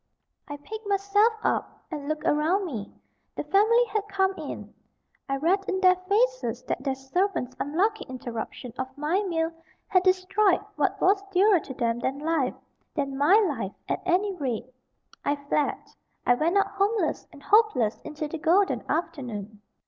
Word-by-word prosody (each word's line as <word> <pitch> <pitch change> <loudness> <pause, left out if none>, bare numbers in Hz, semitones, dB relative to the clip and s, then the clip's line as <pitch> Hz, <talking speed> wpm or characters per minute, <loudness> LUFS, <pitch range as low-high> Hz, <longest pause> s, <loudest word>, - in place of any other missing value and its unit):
I 290 - -6
picked 435 +8 -8
myself 405 +3 +3
up, - - -1
and 295 -2 -5
looked 310 0 -2
about 320 +7 +2
me. 230 - -5 0.4
The - - -3
family 455 +5 +4
had 420 -2 -2
come 390 -1 +1
in. - - -7 0.6
I 275 - +1
read 340 +8 +2
in 380 - 0
their 370 -1 +6
faces 435 +7 0
that - - -3
their 270 -2 0
servant's 270 -1 -1
unlucky 390 +10 0
interruption 240 -1 -6
of 260 - -1
my 310 +7 +1
meal 330 -4 -1 0.4
had 370 - +4
destroyed 375 +1 +3 0.2
what - - 0
was 390 +1 +4
dearer 390 0 +5
to 275 - -8
them 235 -2 0
than 265 +3 -2
life 300 -3 0 0.4
than 275 -3 -2
my 290 +8 +5
life, 205 - -3
at - - -1
any 385 +3 +2
rate. 255 -10 -2 0.6
I 285 - +1
fled. 285 +1 0 0.5
I 245 - +5
went 325 +9 +1
out 400 - +2
homeless 410 +3 0
and 290 -3 -15
hopeless 420 - +3
into 305 0 -5
the 320 +2 -6
golden 370 +6 +3
afternoon. 220 - -3
335 Hz, 160 wpm, -26 LUFS, 280-395 Hz, 0.6 s, their